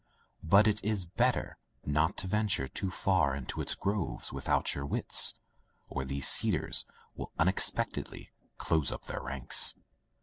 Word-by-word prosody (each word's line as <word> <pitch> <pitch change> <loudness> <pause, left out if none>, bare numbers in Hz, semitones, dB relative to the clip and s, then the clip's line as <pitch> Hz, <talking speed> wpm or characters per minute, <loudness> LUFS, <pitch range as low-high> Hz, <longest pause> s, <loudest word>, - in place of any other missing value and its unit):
But 100 +6 +4
it 105 0 0
is 105 -3 -1
better 120 +9 -1 0.3
not 75 +5 0
to 95 - -3
venture 105 -9 0
too 95 - -4
far 90 -7 +1
into 65 -2 -5
its - - -2
groves 100 -2 -3
without - - 0
your 70 - -5
wits, 70 - +3 0.5
or 65 - -4
these 70 +1 -1
cedars - - +2 0.3
will - - -8
unexpectedly 95 +4 0 0.3
close 80 -4 0
up - - -8
their - - -5
ranks. 65 -2 +3
90 Hz, 140 wpm, -30 LUFS, 70-100 Hz, 0.5 s, But